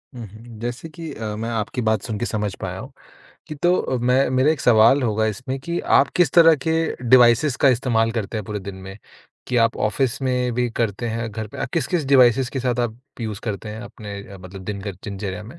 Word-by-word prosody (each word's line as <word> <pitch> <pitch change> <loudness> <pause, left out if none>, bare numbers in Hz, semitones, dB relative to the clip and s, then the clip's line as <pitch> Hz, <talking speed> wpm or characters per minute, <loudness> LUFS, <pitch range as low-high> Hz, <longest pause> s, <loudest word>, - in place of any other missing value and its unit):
हुँ, 120 -2 -7
हुँ। 110 +2 -13
जैसे 120 +7 -5
कि 165 -1 -8
अ, 105 -1 -5
मैं 115 +2 -4
आपकी 115 +2 -3
बात 110 -2 +1
सुनके 115 +1 -3
समझ 105 -4 -2
पाया 95 0 -4
हूँ, 130 +6 -9 0.6
कि 155 - -5
तो 175 +5 +2
अ, 130 - -1
मैं 125 +3 +2
मेरा 130 +4 +3
एक 155 -5 -1
सवाल 120 +3 +5
होगा 110 -1 +1
इसमें 130 +5 -4
कि 170 +4 -3 0.2
आप - - +4
किस 175 -7 +4
तरह 165 -2 +7
के 160 - +2 0.4
डिवाइसेज़ 125 +2 +5
का 140 - +6
इस्तेमाल 115 -2 +2
करते 110 -1 -3
हैं 105 - -4
पूरे 105 +1 -4
दिन 100 0 -7
में? 95 +1 -10 0.5
कि 125 - -1
आप 115 - +1
ऑफ़िस 120 +4 0
में 125 -1 0
भी 125 0 0
करते 115 0 -2
हैं 115 0 -3
घर 110 +1 -5
पे, - - -11
अ - - -1
किस-किस 170 -2 0
डिवाइसेज़ 125 -1 +5
के 135 - -3
साथ 125 -1 -1
आप 120 -1 -2 0.2
यूज़ 110 -1 -4
करते 105 -1 -4
हैं 110 +1 -7
अपने 105 -4 -8
अ 100 - -11
मतलब 95 +1 -10
दिनकर 100 -1 -5
दिनचर्या 100 0 -5
में? 120 +11 -12
115 Hz, 225 wpm, -22 LUFS, 105-130 Hz, 0.6 s, तरह